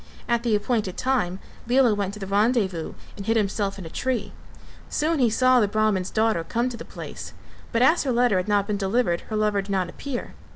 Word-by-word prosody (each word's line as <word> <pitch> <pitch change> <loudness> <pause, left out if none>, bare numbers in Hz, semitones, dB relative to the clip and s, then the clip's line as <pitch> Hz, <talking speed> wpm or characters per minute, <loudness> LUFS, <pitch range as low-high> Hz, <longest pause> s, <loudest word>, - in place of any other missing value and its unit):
At 235 -1 +1
the 235 -3 +2
appointed 210 -3 -1
time 240 -9 0 0.3
Lela 245 -2 +4
went 200 -1 -2
to - - -9
the 195 - -5
rendez 205 +1 +2
vous 165 -3 -6 0.2
and 200 -2 -8
hid 225 0 +3
himself 200 -1 -1
in 190 - -8
a - - -7
tree; 255 -2 -2 0.6
soon 310 +1 0
he 245 -3 +4
saw 255 +3 +4
the 210 - +3
Brahman's 205 -3 +1
daughter 220 -6 +1
come 235 +8 -1
to 240 - -7
the - - -7
place, - - -8 0.4
but 230 +1 +2
as 315 +6 +5
her 270 - -1
letter 240 -4 +3
had 185 - -1
not 205 -1 +2
been 210 -1 -1
delivered 195 -2 +1
her 215 - -2
lover 210 -1 +1
did 195 - -12
not 190 -3 0
appear. 275 -4 -6
215 Hz, 220 wpm, -24 LUFS, 195-245 Hz, 0.6 s, as